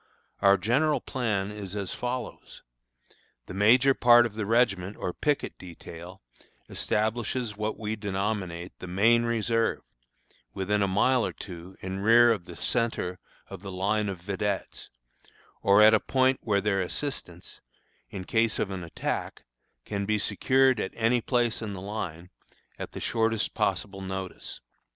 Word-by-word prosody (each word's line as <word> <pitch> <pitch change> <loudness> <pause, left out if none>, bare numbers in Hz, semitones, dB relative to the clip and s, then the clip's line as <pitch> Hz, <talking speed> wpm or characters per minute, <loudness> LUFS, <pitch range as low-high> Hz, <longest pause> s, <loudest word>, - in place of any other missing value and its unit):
Our 100 0 +6
general 135 - +2
plan 105 -6 -2
is 105 -2 -7
as 100 -3 -3
follows: 125 -1 -5 0.8
The - - -9
major 125 +7 +5
part 120 -2 +6
of 115 - -4
the 105 -2 -4
regiment 105 -4 +1
or 90 - -3
picket 150 -2 -1
detail 90 +1 -11 0.4
establishes 110 +1 -1
what 105 +1 -3
we 110 0 -3
denominate 95 -3 -3
the 90 - -7
"main 115 +6 +3
reserve" 115 0 0 0.7
within 100 +2 0
a 100 - +3
mile 120 +6 +3
or - - -1
two 90 0 -10
in 95 +1 -4
rear 115 +3 +6
of 100 -6 -1
the 85 - -10
centre 115 -7 -1 0.3
of 95 -2 -9
the 100 -1 -7
line 100 +3 0
of 95 - -4
vedettes, 100 +2 -3 0.7
or 100 +2 +6
at 110 +1 +8
a 110 - +5
point 130 +2 +2
where 100 -3 +1
their 100 -1 +1
assistance, 90 - -5 0.5
in 95 - -6
case 110 +3 +1
of 100 - -1
an 95 -2 -5
attack, 85 - -4 0.4
can 100 -1 -3
be 110 0 +2
secured 130 +5 +2
at 95 - -3
any 115 +1 +2
place 120 -2 0
in 105 -2 -4
the 95 - -6
line, 90 -4 -6 0.5
at - - -6
the - - -6
shortest 115 -1 0
possible 100 -1 -1
notice. 95 -1 -6
105 Hz, 150 wpm, -27 LUFS, 95-115 Hz, 0.8 s, at